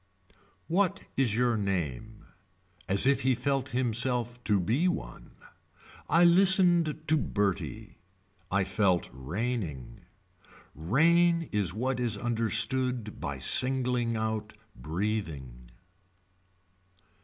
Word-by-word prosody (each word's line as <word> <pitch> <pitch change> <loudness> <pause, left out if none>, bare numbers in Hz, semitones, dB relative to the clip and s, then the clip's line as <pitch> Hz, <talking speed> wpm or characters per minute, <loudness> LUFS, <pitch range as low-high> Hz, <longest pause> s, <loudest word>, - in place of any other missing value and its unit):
What 195 +3 0
is 125 -6 +1
your 120 0 +1
name. 100 - -4 0.6
As 100 +5 +4
if 140 +1 +3
he 130 -1 +2
felt 135 +2 -2
himself 120 0 -1
to 105 -2 +2
be 120 - 0
one. - - -5 0.8
I 165 +3 +4
listened 175 -3 +4
to 155 - +2
Bertie. 105 - -3 0.5
I 100 +1 +2
felt 95 -2 0
raining. 80 - -5 0.7
Rain 165 - +2
is 100 -4 -1
what 125 +3 -2
is 120 -4 0
understood 120 +1 -1
by 70 -1 -5
singling 125 - +2
out 110 -1 -3 0.2
breathing. 75 - -5
115 Hz, 95 wpm, -28 LUFS, 100-130 Hz, 0.8 s, As